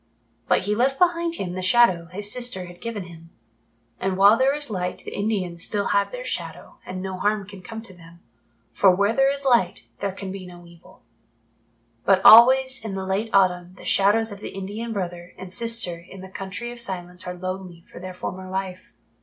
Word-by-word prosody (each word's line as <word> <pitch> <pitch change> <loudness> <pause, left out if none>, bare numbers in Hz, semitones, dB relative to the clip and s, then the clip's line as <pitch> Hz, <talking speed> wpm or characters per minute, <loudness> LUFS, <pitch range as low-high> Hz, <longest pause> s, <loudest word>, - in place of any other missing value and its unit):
But - - +3
he 210 - 0
left 260 +5 +1
behind 340 0 +2
him 180 - -4
the 185 - -4
Shadow 185 -3 +4
his 205 +4 -2
sister 240 -7 -1
had 175 0 -13
given 230 -4 -4
him; 165 -1 -13 0.7
and 190 0 -1
while 200 +3 +7
there 265 +4 +2
is 295 -5 -5
Light 180 -2 -3
the - - -7
Indians 190 -5 -2
still 205 -1 -1
have 200 0 +1
their - - -6
Shadow - - -5
and 185 0 -5
no 190 -1 -5
harm 205 -1 0
can 200 -1 -11
come 225 +3 -8
to 200 - -12
them, 170 -1 -16 0.5
for 195 - +5
where 200 +4 +3
there 270 +2 +3
is 280 0 -6
Light 235 -9 +2
there 200 -1 -2
can 195 0 -7
be 190 -1 -8
no 175 -1 -13
evil. 170 0 -18 1.0
But 190 -1 +3
always 260 +3 +8
in 210 -3 -4
the 190 0 -4
late 195 +4 -1
autumn 180 -2 +2
the - - -14
Shadows 210 +3 +3
of 200 - -8
the - - -6
Indian 205 +4 -5
brother 175 -4 -5
and 185 -1 -8
sister 230 -7 0
in 185 +2 -13
the 190 - -10
Country 195 +5 -6
of 240 -1 -9
Silence 180 -4 -6
are 180 - -4
lonely 185 -1 -6
for - - -13
their 185 0 -8
former 185 +1 -6
life. 190 -1 -5
195 Hz, 205 wpm, -23 LUFS, 180-225 Hz, 1.0 s, always